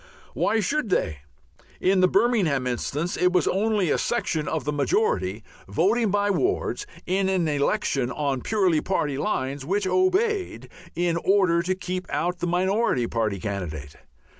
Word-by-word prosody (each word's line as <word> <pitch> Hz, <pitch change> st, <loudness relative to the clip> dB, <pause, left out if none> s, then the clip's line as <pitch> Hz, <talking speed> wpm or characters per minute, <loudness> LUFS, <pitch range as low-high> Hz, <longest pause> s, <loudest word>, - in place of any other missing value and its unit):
Why 225 Hz, -, +1 dB
should 280 Hz, +3 st, -1 dB
they? 75 Hz, -, 0 dB, 0.6 s
In 190 Hz, +1 st, +3 dB
the 185 Hz, -, +5 dB
Birmingham 195 Hz, -, +2 dB
instance 145 Hz, +7 st, -2 dB
it 180 Hz, 0 st, +2 dB
was 180 Hz, -4 st, +2 dB
only 205 Hz, -3 st, +1 dB
a -, -, +1 dB
section 160 Hz, -10 st, -1 dB
of -, -, -2 dB
the 150 Hz, +2 st, -2 dB
majority, 435 Hz, -, 0 dB, 0.2 s
voting 240 Hz, -, +2 dB
by 205 Hz, +1 st, +1 dB
wards, 390 Hz, -, -1 dB, 0.2 s
in 190 Hz, +1 st, +1 dB
an 185 Hz, -4 st, +1 dB
election 145 Hz, -, 0 dB
on 140 Hz, -1 st, -2 dB
purely 185 Hz, -8 st, +1 dB
party 145 Hz, -7 st, -1 dB
lines, 140 Hz, -7 st, -2 dB
which 195 Hz, +7 st, -1 dB
"obeyed" 375 Hz, -, 0 dB, 0.2 s
in 175 Hz, -1 st, 0 dB
order 185 Hz, -2 st, +3 dB
to 185 Hz, +2 st, -1 dB
keep 185 Hz, 0 st, -5 dB
out 175 Hz, +1 st, -1 dB
the 175 Hz, -, -1 dB
minority 185 Hz, -, +1 dB
party 110 Hz, -4 st, -1 dB
candidate. 85 Hz, -8 st, -5 dB
180 Hz, 150 wpm, -25 LUFS, 145-210 Hz, 0.6 s, the